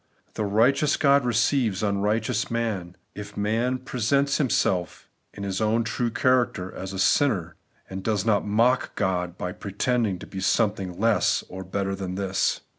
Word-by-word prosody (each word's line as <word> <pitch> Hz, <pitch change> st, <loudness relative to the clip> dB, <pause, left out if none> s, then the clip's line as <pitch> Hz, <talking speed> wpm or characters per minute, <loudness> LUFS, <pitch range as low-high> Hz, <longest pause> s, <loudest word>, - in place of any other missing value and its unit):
The 105 Hz, -, -2 dB
righteous 125 Hz, +8 st, +3 dB
God 140 Hz, -2 st, +4 dB
receives 120 Hz, -3 st, +1 dB
imrighteous 105 Hz, +3 st, 0 dB
man, 105 Hz, -7 st, -3 dB, 0.2 s
if 105 Hz, 0 st, -9 dB
man 115 Hz, +5 st, 0 dB
pre 125 Hz, -, -7 dB
sents 140 Hz, +5 st, +2 dB
himself 95 Hz, -, 0 dB, 0.2 s
in 100 Hz, -, -8 dB
his 100 Hz, +1 st, -2 dB
own 110 Hz, +2 st, +2 dB
true 115 Hz, +2 st, -1 dB
character 120 Hz, -7 st, +1 dB
as 95 Hz, 0 st, -6 dB
a 95 Hz, -, -6 dB
sinner, 95 Hz, -, +2 dB, 0.3 s
and 95 Hz, 0 st, -6 dB
does 105 Hz, -2 st, 0 dB
not 105 Hz, -3 st, +2 dB
mock 115 Hz, +5 st, +1 dB
Gk)d 90 Hz, -3 st, -1 dB
by 90 Hz, -, -3 dB
pretending 105 Hz, +2 st, -1 dB
to -, -, -10 dB
be 95 Hz, -, -7 dB
some 105 Hz, +2 st, +2 dB
thing 95 Hz, -4 st, -7 dB
less 115 Hz, 0 st, +2 dB
or 95 Hz, +1 st, -7 dB
better 95 Hz, +1 st, -2 dB
than 95 Hz, -1 st, -4 dB
this. 95 Hz, 0 st, 0 dB
105 Hz, 165 wpm, -25 LUFS, 95-120 Hz, 0.3 s, God